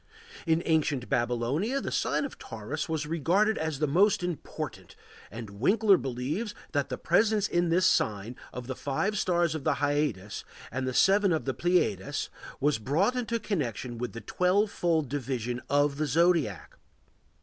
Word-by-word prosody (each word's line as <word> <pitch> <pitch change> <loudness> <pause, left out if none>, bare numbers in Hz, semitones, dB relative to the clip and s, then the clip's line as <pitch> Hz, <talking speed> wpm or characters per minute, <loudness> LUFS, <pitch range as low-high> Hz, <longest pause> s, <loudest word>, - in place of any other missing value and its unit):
In 165 +1 +2
ancient 150 -6 +1
Babylonia 125 - 0
the - - -4
sign - - 0
of 275 - -8
Taurus 115 +9 -5
was 160 -1 -1
regarded 175 +8 +2
as 160 -2 -2
the 150 - +1
most 180 +7 +3
important, 175 -4 -5 0.3
and 110 -2 -9
Winckler 205 - +5
believes 140 - -3 0.2
that 145 -2 0
the 125 - -3
presence 210 +3 +2
in 175 0 +1
this 180 +2 +3
sign 110 - +1 0.2
of 125 -1 -7
the 130 +1 -4
five 145 +12 -1
stars 175 -4 +1
of 155 -3 -4
the 155 -1 +2
Hyades 145 -9 -1 0.3
and 130 +1 -2
the 130 - -2
seven 200 0 +4
of 160 - 0
the 135 - -1
Pleiades 175 - 0 0.3
was 145 -4 +2
brought 165 - +1
into 235 -2 -1
connection 125 - -3
with 125 0 -4
the 115 - -7
twelve 200 +4 +1
fold 160 -4 +1
division 125 -3 -3
of 145 0 +2
the 155 0 0
zodiac. 160 - +1
150 Hz, 160 wpm, -28 LUFS, 125-180 Hz, 0.3 s, Winckler